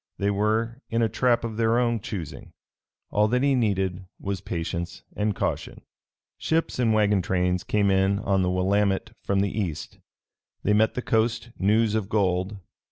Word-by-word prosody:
They 100 +1 +1
were 110 +4 0
in 115 0 +1
a 110 - +2
trap 120 +2 +2
of 115 -2 -4
their 115 0 +2
own 120 -2 +1
choosing. 90 -7 -7 0.6
All 105 +1 +3
that 125 +4 +1
he 140 -1 +3
needed 95 -6 0
was 100 -2 -3
patience 85 -2 -4
and 105 -1 0
caution. - - -3 0.6
Ships 160 -4 0
and 115 -3 +3
wagon 105 -2 +3
trains 90 0 0
came 100 -2 +2
in 95 +1 +3
on 95 -1 +1
the 90 - +1
Willamette 95 +2 +1
from 100 0 +1
the 100 -1 0
East. 90 -8 -4 0.6
They 105 - +2
met 110 +1 +3
the 125 - -3
coast 115 +1 0
news 105 +2 +3
of 110 -3 -1
gold. 95 -1 0
105 Hz, 165 wpm, -25 LUFS, 95-115 Hz, 0.6 s, All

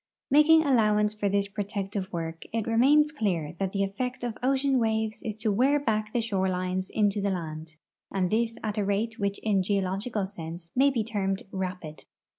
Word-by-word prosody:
Making 310 +3 +6
al 280 -3 +2
lowance 210 -1 +3
for 205 -1 0
this 200 0 +1
protective 200 -1 -4
work, 165 -1 -5
it 225 -1 -1
remains 280 +7 +4
clear 185 - -1
that 195 -1 -1
the 200 0 0
effect 245 +6 -3
of 240 -2 -2
ocean 270 +1 +2
waves 220 -1 0
is 215 -2 -4
to 220 0 -1
wear 265 +8 +3
back 215 -5 -1
the 240 - 0
shorelines 185 -3 -1
into 205 -1 +1
the 200 - +1
land, 160 -3 -5 0.4
and 185 -2 0
this 230 +1 0
at 215 -1 -2
a - - +1
rate 215 +4 -1
which 200 0 -1
in 210 -3 +2
a - - +2
geological 195 +2 -1
sense 170 -3 -8
may 270 +2 +5
be 240 -5 0
termed 195 -3 -2
rapid. 180 -5 -5
205 Hz, 190 wpm, -27 LUFS, 190-230 Hz, 0.4 s, Making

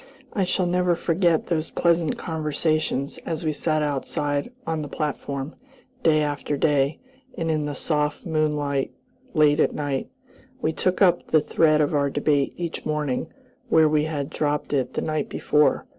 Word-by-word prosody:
I 200 -7 +1
shall 185 0 +1
never 180 0 +2
forget 170 -1 +1
those 160 -2 -1
pleasant 170 -2 +1
conversations 155 -3 -1
as 165 0 -4
we 155 - +2
sat 155 0 +1
outside 145 - -1
on 160 -1 -1
the 150 - -5
platform, 140 -1 -3 0.5
day 155 -7 +4
after 145 0 -2
day, 140 0 +2 0.4
and 165 -2 0
in 150 -1 0
the 145 - -4
soft 150 +2 -1
moonlight 150 -4 0 0.4
late 150 -1 +4
at - - +2
night. 145 -3 -2 0.5
We 160 -9 0
took 185 +4 +1
up 175 -2 +3
the 155 - +5
thread 155 0 +3
of 145 - +1
our 140 -1 +2
debate 145 -1 +1
each 170 -2 -4
morning 150 -4 -2 0.4
where 160 -6 +5
we 150 0 +2
had 150 -2 -3
dropped 150 -1 -1
it 130 -3 0
the - - -1
night 155 -2 -2
before. 150 0 +2
155 Hz, 160 wpm, -24 LUFS, 145-160 Hz, 0.5 s, the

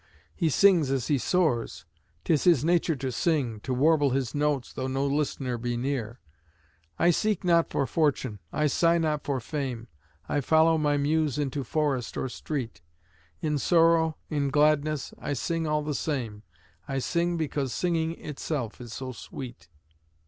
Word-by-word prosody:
He 165 -4 +1
sings 175 -3 +4
as 135 -3 -1
he 145 -3 +2
soars; 120 - 0 0.4
'tis 155 -4 +1
his 160 -6 +4
nature 170 -1 +2
to 130 -1 -3
sing, 130 -7 0
To 130 - -6
warble 145 +2 +3
his 130 -2 -1
notes 145 -3 -1
though 130 - -3
no 135 +1 -1
listener 140 -3 -1
be 120 0 -2
near. 120 -2 -3 0.8
I 175 - +4
seek 210 +3 0
not 170 -2 +3
for 140 - 0
fortune, 135 -9 0
I 150 - 0
sigh 165 +4 +3
not 155 -3 0
for 140 -2 -1
fame, 125 -3 -4 0.4
I 145 - 0
follow 160 +3 +4
my 145 -1 +2
Muse 150 -1 +1
into 140 -1 -2
forest 135 -2 -1
or 130 - -2
street; 120 - -5 0.6
In 150 -2 0
sorrow, 165 0 +3
in 145 -2 -1
gladness, 150 0 +2
I - - -3
sing 165 +3 -2
all 150 0 0
the 150 0 -2
same, 120 -9 -3 0.5
I 135 - -2
sing 170 +5 0
because 145 -4 -2
singing 165 0 0
itself 140 -6 -4
is 120 -2 -9
so 130 -1 -5
sweet. 125 -3 -9
145 Hz, 160 wpm, -27 LUFS, 130-160 Hz, 0.8 s, sings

